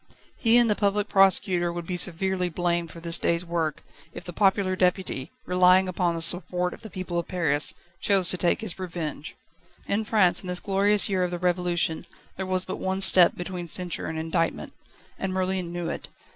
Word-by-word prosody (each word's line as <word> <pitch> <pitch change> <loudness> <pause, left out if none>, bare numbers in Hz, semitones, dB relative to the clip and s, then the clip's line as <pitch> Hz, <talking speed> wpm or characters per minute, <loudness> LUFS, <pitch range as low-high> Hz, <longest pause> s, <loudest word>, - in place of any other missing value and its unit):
He 230 0 +4
and 240 -1 +4
the 210 - +3
Public 205 0 0
Prosecutor 190 -2 +3
would 170 0 -6
be 180 - -4
severely 180 +1 -1
blamed 175 0 -1
for 170 - -11
this 165 0 +2
day's 170 +1 0
work, 165 -3 -3 0.3
if - - -9
the 175 - -8
popular 190 0 +1
Deputy, 180 -7 -1
relying 180 +1 +4
upon 175 -2 -1
the 165 - -1
support 180 +1 0
of - - -13
the 220 - -10
people 185 -2 -4
of 170 - -5
Paris, 155 -5 -1 0.3
chose 190 -3 +2
to 185 - 0
take 175 +5 +1
his 205 -4 -3
revenge. 165 -5 -6 0.5
In 210 +2 0
France, 190 -5 +2
in 185 - -10
this 180 0 -3
glorious 200 +1 +2
year 190 -2 0
of 180 - -1
the 175 - -4
Revolution, 175 -2 -1 0.3
there 190 - -5
was 185 0 -1
but 185 - -5
one 190 +1 -3
step 185 -2 +8
between 175 -1 -6
censure 180 +1 -1
and 160 - -5
indictment. 165 +1 -2 0.5
And 195 -1 -3
Merlin 185 -2 -2
knew 175 -1 -4
it. - - -6
180 Hz, 195 wpm, -25 LUFS, 170-190 Hz, 0.5 s, step